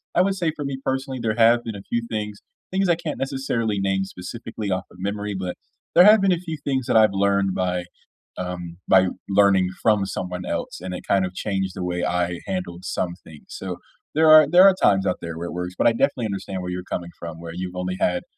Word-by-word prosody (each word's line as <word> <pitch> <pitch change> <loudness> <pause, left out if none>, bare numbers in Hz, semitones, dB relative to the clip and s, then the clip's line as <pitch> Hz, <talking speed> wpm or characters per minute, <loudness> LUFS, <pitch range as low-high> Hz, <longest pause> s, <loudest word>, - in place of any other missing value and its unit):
I - - +5
would 195 +1 +1
say 170 -4 0
for 145 - -5
me 140 -1 -3
personally, 135 0 -2
there 110 -2 0
have 120 +1 +5
been 115 -2 -4
a 100 - -7
few 120 - 0
things 105 -2 -4 0.3
things 190 +1 +1
I 170 - +5
can't 160 -2 -5
necessarily 120 -6 -1
name 95 0 0
specifically 105 +3 -6
off 95 +1 -1
of - - -16
memory, 100 +1 -3
but 90 -1 -4 0.4
there 175 - +8
have 215 +3 +8
been 195 -1 +4
a - - 0
few 165 -3 -5
things 130 -3 -1
that - - +4
I've 110 -2 +5
learned 100 -1 +1
by, 90 -1 -1 0.5
um, 90 -2 -5
by 95 -1 +5 0.2
learning 100 -2 +4
from 105 -3 +3
someone 90 -1 -4
else, - - -4
and 90 0 -5
it 90 - -7
kind 95 -1 +3
of 90 - -6
changed 95 -1 -2
the 90 - -5
way 90 0 -2
I 90 0 0
handled 90 -1 -4
some 85 -1 -2
things. 75 -2 -14
So, 90 -2 -6 0.4
there 160 +1 +4
are 155 0 +9
there 175 +3 +7
are 195 -1 +7
times 95 -1 +4
out 90 - 0
there 85 -1 -6
where 85 +1 -4
it - - -6
works. 90 +1 -4
But - - +3
I - - +6
definitely 130 -1 +1
understand 95 -2 -4
where 90 - -5
you're 90 0 -4
coming 85 -1 -5
from. 85 -1 -7
Where 85 -1 -8
you've 90 0 -5
only 90 0 -2
had 90 0 +1
95 Hz, 235 wpm, -23 LUFS, 90-120 Hz, 0.5 s, are